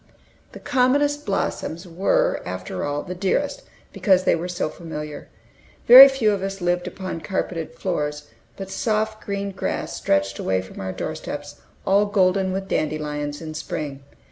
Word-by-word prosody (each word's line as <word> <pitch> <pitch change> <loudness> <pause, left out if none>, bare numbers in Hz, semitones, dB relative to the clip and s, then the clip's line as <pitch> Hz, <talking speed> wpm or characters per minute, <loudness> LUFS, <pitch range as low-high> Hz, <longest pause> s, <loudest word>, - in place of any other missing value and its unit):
The - - -9
commonest 285 +1 +1
blossoms 185 -3 -2
were, 175 +3 +1
after 90 0 -5
all, 145 0 -2
the 180 - -6
dearest, 195 - -1 0.3
because 190 -3 +3
they - - +3
were 170 +2 -4
so 175 -3 -2
familiar. 150 -2 -7 0.6
Very 260 +3 +13
few 260 -6 +1
of 200 -2 -1
us 195 0 -4
lived 175 0 0
upon 185 -2 -5
carpeted 165 -1 -3
floors, 150 -5 -2 0.3
but 195 -1 -7
soft 215 +2 -1
green 200 0 -3
grass 190 - -3
stretched 100 0 0
away 95 0 0
from 95 - -11
our 95 0 -3
door - - -4
steps, - - -7 0.3
all 200 +2 +3
golden 190 -1 +2
with 190 +1 -3
dandelions 150 -1 -2
in 155 -1 -6
spring. 145 -2 -5
180 Hz, 155 wpm, -23 LUFS, 150-200 Hz, 0.6 s, Very